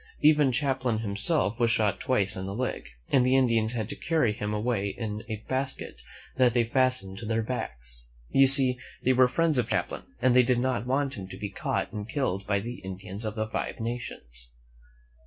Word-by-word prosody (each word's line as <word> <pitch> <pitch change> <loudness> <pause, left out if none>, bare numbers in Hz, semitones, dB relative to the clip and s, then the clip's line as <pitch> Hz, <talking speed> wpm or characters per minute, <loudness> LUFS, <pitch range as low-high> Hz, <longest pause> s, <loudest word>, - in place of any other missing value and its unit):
Even 150 -3 +5
Cham 135 +1 0
plain 125 -4 0
himself 110 +3 0
was 120 -1 +3
shot 110 -4 +2
twice 120 -6 +1
in 95 -1 -5
the 100 - -4
leg, 130 +2 -3 0.2
and 130 -3 +5
the 130 +1 +3
Indians 115 -3 +3
had 110 -4 -2
to - - -4
carry 155 -10 +1
him 105 0 -4
away 105 -1 0
in 110 -2 -4
a 110 -1 -5
basket 130 - -3 0.4
that 125 -2 +4
they 120 -1 +3
fastened 120 -5 0
to 115 - -7
their 115 0 0
backs. 60 - -5 0.3
You 135 0 +6
see, 130 -2 +5 0.2
they 130 - +4
were 130 0 +5
friends 160 +1 +2
of 120 - -1
Champlain, - - -1 0.2
and 125 0 +3
they 125 - +8
did 125 0 +2
not 125 -2 -1
want 135 +1 0
him 95 - -7
to 95 - -9
be 100 0 -5
caught - - -2
and 105 +1 -5
killed 100 - -1
by 100 -1 +1
the 120 +3 -6
Indians 95 +2 -6
of 110 -1 -3
the 110 -1 -1
Five 110 - -4
Nations. 65 - -5
115 Hz, 205 wpm, -28 LUFS, 105-130 Hz, 0.4 s, they